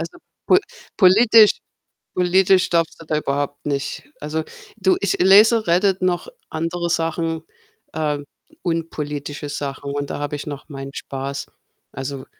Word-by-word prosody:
Also, 165 - -6 0.3
po 370 - +6 0.4
politisch 215 +3 +6 0.5
politisch 185 +1 +3
darfst 165 -1 0
du - - -11
da 155 0 0
überhaupt 145 0 -2
nicht 140 -1 -3 0.2
also, 155 +1 -2 0.3
du, 190 -2 +3
ich 200 - +1
lese 210 +4 +6
Reddit, 185 +2 +2
noch 180 -1 0 0.2
andere 165 +2 -2
Sachen, 165 -1 -1 0.5
ähm, 150 -2 -2 0.4
unpolitische 150 -4 -4
Sachen 140 -1 -4
und 145 0 -3
da - - -4
habe 145 0 -3
ich 145 - -6
noch 145 +1 -7
meinen 135 -1 -7
Spaß. 140 +1 -5 0.4
Also, 135 0 -6
160 Hz, 135 wpm, -21 LUFS, 145-180 Hz, 0.5 s, po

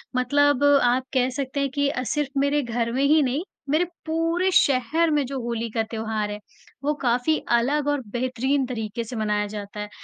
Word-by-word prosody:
मतलब 285 +2 +3 0.2
आप 245 +1 +2
कह 255 -1 +2
सकते 270 +2 -3
हैं 280 0 0
कि 285 -1 +2
अ, 255 -2 -2
सिर्फ़ 280 +1 -2
मेरे 285 +1 +2
घर 235 -1 -2
में 265 +2 +1
ही 305 +2 +5
नहीं, 270 +5 -1 0.3
मेरे 310 +5 +3 0.2
पूरे 330 +3 +1
शहर 290 +2 +3
में 295 -2 +2
जो 270 +1 -4
होली 235 -1 -3
का 225 - 0
त्योहार 220 -2 -2
है, 210 - -5 0.4
वो 295 +2 +1
काफ़ी 250 +5 +2 0.2
अलग 285 +5 0
और 290 -1 +1
बेहतरीन 255 +3 0
तरीके 230 -2 -4
से 230 +2 -8
मनाया 210 -1 0
जाता 205 0 -7
है। 210 0 -5
255 Hz, 190 wpm, -24 LUFS, 235-285 Hz, 0.4 s, ही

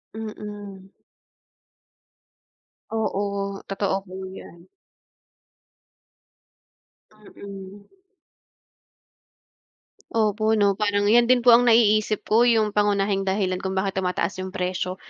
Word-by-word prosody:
Mm. 205 -3 -9 2.0
Oo, 200 -2 -3
totoo 195 0 -1
po 185 - -12 0.2
'yan. 170 -2 -13 2.4
Mm. 200 -2 -12 2.2
Opo, 215 0 +1
'no? 205 -2 +3
Parang 205 -1 +1
'yan 235 +3 +4
din 250 -1 +3
po 245 - +7
ang 240 +1 +5
naiisip 215 -2 +3
ko, 230 +3 +3
yung 220 -3 +2
pangunahing 200 -1 0
dahilan 190 -1 -1
kung 190 0 -4
bakit 190 0 -1
tumataas 185 0 -2
yung 185 0 -6
presyo 180 0 -3
205 Hz, 90 wpm, -23 LUFS, 195-215 Hz, 2.4 s, po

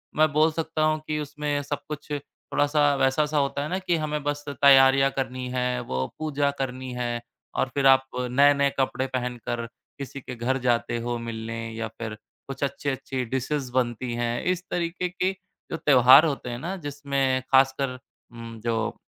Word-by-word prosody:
मैं 155 0 +4
बोल 155 +2 +4
सकता 160 0 -2
हूँ 155 0 +2
कि 155 0 -1
उसमें 150 0 -2
सब 145 0 -3
कुछ 150 0 -7
थोड़ा-सा 145 0 0
वैसा-सा 150 +3 +1
होता 140 0 0
है 150 - -4
ना 185 +2 -1
कि 180 -2 0
हमें 150 -1 -2
बस 145 0 -2
तैयारियाँ 135 0 +6
करनी 130 -1 -2
हैं, 125 0 -1
वो 65 - -2
पूजा 145 -2 0
करनी 130 -1 -4
है, 120 -1 -2 0.3
और 130 - 0
फिर 140 -1 0
आप 135 0 +6
नए-नए 140 +3 +4
कपड़े 130 0 0
पहनकर 125 -2 -3 0.3
किसी 140 0 -7
के 125 - -7
घर 125 +3 0
जाते 120 -1 +1
हो 120 +1 -2
मिलने 115 0 -5 0.2
या 115 0 -3
फिर, 110 0 -7 0.3
कुछ 135 +1 -5
अच्छी-अच्छी 135 -1 -2
डिशेज़ 130 +2 -2
बनती 120 -1 -1
हैं। 120 0 -1
इस 180 0 0
तरीक़े 175 +1 -1
के 185 +1 0 0.4
जो - - -2
त्यौहार 135 -1 +7
होते 140 -5 -2
हैं 120 0 -4
ना 175 +7 -4
जिसमें 140 -4 -1
ख़ासकर 135 -1 +3 0.3
उम, 115 -1 -9
जो 115 0 -2
135 Hz, 170 wpm, -25 LUFS, 125-145 Hz, 0.4 s, त्यौहार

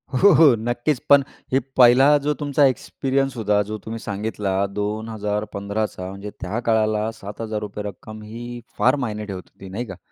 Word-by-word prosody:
हो, 200 +9 +6
हो, 160 +2 +7
नक्कीच. 120 +4 -1
पण 140 -1 +7 0.3
हे 135 - +5 0.2
पहिला 130 +4 +7
जो 150 - +3
तुमचा 145 -1 +3
एक्सपिरियन्स 135 0 0
होता, 105 -2 +2
जो 110 +1 -5
तुम्ही 115 +1 -5
सांगितला 105 -2 -3 0.2
2015चा, 105 -2 -3
म्हणजे 100 +2 -7
त्या 100 +6 -2
काळाला 110 -1 +2
₹7,000 105 0 -5
रक्कम 110 +1 -11
ही 120 +3 -7 0.2
फार 125 +6 +4
मायने 105 -1 -4
ठेवत 95 -3 -6
होती, 95 - -12
नाही 110 +6 -4
का? 95 -5 -9
110 Hz, 155 wpm, -22 LUFS, 105-120 Hz, 0.3 s, हो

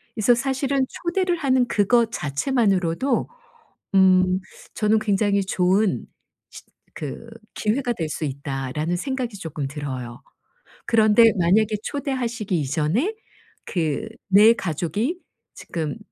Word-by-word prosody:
그래서 225 +2 +4
사실은 270 +1 0 0.2
초대를 355 0 +1
하는 260 -4 +2
그것 230 +2 +2
자체만으로도 195 - 0 0.7
음 185 -1 +5 0.4
저는 215 0 +2
'굉장히 200 -1 +1
좋은 185 - +1 0.4
시 - - -12 0.3
그 150 +9 -7 0.3
기회가 240 +3 0
될 160 -5 -3
수 155 - -4
있다.'라는 140 +4 -3
생각이 250 -1 -4
쪼끔 155 -5 -5
들어요. 130 -5 -6 0.7
그런데 220 0 +5
만약에 210 +5 +3
초대하시기 240 - -2
이전에 160 - 0 0.5
그 170 +5 -2 0.2
4 210 +4 +7
가족이 200 - -2 0.4
지금 160 +2 -5
205 Hz, 245 characters per minute, -23 LUFS, 160-240 Hz, 0.7 s, 4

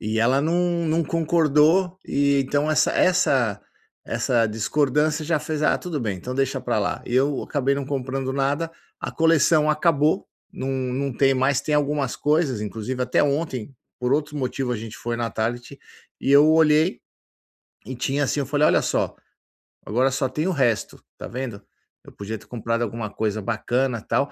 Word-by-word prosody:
E 110 +1 -2
ela 125 +4 +3
não 170 +2 0
não 160 +1 +1
concordou, 165 +2 +2
e 140 0 +2
então 145 +3 0
essa 155 - +3
essa 130 - +2 0.4
essa 115 -2 +1
discordância 150 +7 0
já 165 0 +1
fez: 155 0 -4
"Ah, - - +3
tudo 165 -5 -4
bem, 105 -5 -2
então 125 +8 -6
deixa 135 0 0
pra - - -1
lá". - - -2
Eu 135 +3 +1
acabei 140 -1 0
não 140 - -3
comprando 135 -1 -3
nada, 140 +4 -1 0.3
a - - -4
coleção 160 -1 +3
acabou, 155 +2 +2 0.3
não 135 -9 -5
não 130 +1 -2
tem 135 +2 +3
mais. 130 +1 +2
Tem 150 +1 -1
algumas 145 -2 -1
coisas, 150 -6 +1
inclusive, 115 +5 -5
até 125 - +2
ontem, 140 -4 -2 0.3
por 125 +1 0
outro 150 +1 -1
motivo, 130 -1 -2
a - - -1
gente 110 0 -8
foi 120 0 -4
na 115 -1 -2
Target, 120 +4 -4 0.4
e 135 - -1
eu 145 +2 +7
olhei 160 +1 +3 0.9
e 130 - -5
tinha, 135 +3 -1
assim. 135 - -1
Eu 140 - -2
falei: 145 +2 +2
"Olha - - +3
só, - - -1 0.7
agora 125 +6 +2
só 135 +1 0
tem 150 +6 -2
o - - +1
resto, 125 - 0 0.2
tá - - -6
vendo?". 120 -4 -6 0.4
Eu - - -13
podia 110 +2 -6
ter - - -18
comprado 115 0 -2
alguma 115 -1 -4
coisa 110 -1 -2
bacana, 120 +2 -1
tal. 140 +5 -1
135 Hz, 175 wpm, -23 LUFS, 120-150 Hz, 0.9 s, eu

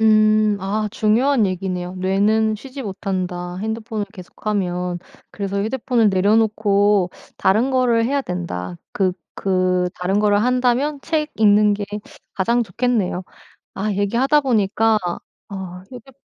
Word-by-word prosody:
음. 215 -1 +4
아 210 +3 -1
중요한 230 +3 +2
얘기네요. 185 -1 -3
'뇌는 210 +4 +2
쉬지 270 +3 -8
못한다 185 -3 -4
핸드폰을 220 0 -3
계속하면. 180 -2 -3 0.3
그래서 200 0 -3
휴대폰을 230 0 +1
내려 200 +3 +3
놓고 205 -3 +2 0.3
다른 225 +8 +3
거를 240 -3 +3
해야 280 +4 +1
된다.' 90 - -5 0.2
그 185 -2 +1 0.3
그 185 -1 +1
다른 185 +3 0
거를 205 0 +3
한다면 250 +4 +1
책 310 0 -1
읽는게 210 -1 +4 0.5
가장 235 +5 +1
좋겠네요. 210 -3 -1 0.5
아 210 +2 -2
얘기하다 235 +9 +2
보니까 225 -3 +2 0.5
아 185 -2 -7
휴대 255 +1 -12
210 Hz, 270 characters per minute, -20 LUFS, 190-230 Hz, 0.5 s, 음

